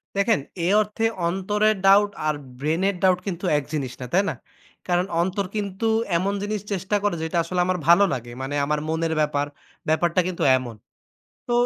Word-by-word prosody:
দেখেন। 200 0 +2 0.3
এ - - +2
অর্থে 215 +2 -2 0.2
অন্তরের 210 +4 +1
doubt 205 +1 +6 0.2
আর 155 - +1 0.2
brain 155 +5 0
এর 200 - -2
doubt 185 -1 +4
কিন্তু 180 -1 -3
এক 145 - -1
জিনিস 140 -5 -2
না। - - -4
তাই 190 +3 +4
না? - - -2 0.5
কারণ 180 0 +2 0.2
অন্তর 190 +3 -1
কিন্তু 200 0 -3 0.3
এমন 195 +4 0
জিনিস 210 0 -2
চেষ্টা 190 +1 -1
করে 205 -4 +1
যে, - - -2 0.2
আসলে 180 +2 -3
আমার 185 0 0
ভালো 175 +4 +7
লাগে। 120 -1 -5
মানে 135 +2 -3
আমার 150 +1 0
মনের 160 0 0
ব্যাপার, 145 -1 0 0.4
ব্যাপারটা 170 +3 +2
কিন্তু 185 -2 -3
এমন। 125 -3 -6 0.7
তো - - 0
180 Hz, 180 wpm, -23 LUFS, 160-200 Hz, 0.7 s, ভালো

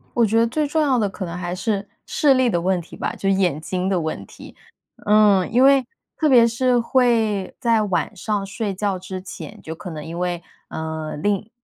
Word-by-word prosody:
我 235 -1 +4
觉 220 +2 +2
得 230 - +4
最 295 +6 -1
重 310 +2 +1
要 270 -4 +2
的 210 - +1
可 190 0 -6
能 170 0 -5
还 175 0 -4
是 200 +1 -2 0.2
视 285 -3 +3
力 255 -2 +3
的 175 - 0
问 185 +1 +1
题 170 - -12
吧， - - -3
就 195 - -2
眼 185 -6 +1
睛 180 +4 -2
的 190 -2 +1
问 160 -1 -4
题。 - - -13 0.5
嗯， 205 -3 +4
因 245 +3 +4
为 275 -1 +5 0.3
特 310 - +2
别 245 -4 +7
是 245 +2 +2
会 230 -5 +1
在 230 -4 +2
晚 205 +1 -1
上 205 +1 -2
睡 200 0 -3
觉 195 -1 -1
之 185 0 -7
前， 165 -5 -9
就 160 - -6
可 180 +2 -8
能 155 -2 -7
因 165 +2 -6
为， 175 -1 -2 0.3
呃 160 -1 -5
另 205 +6 -1
200 Hz, 225 characters per minute, -21 LUFS, 180-235 Hz, 0.5 s, 别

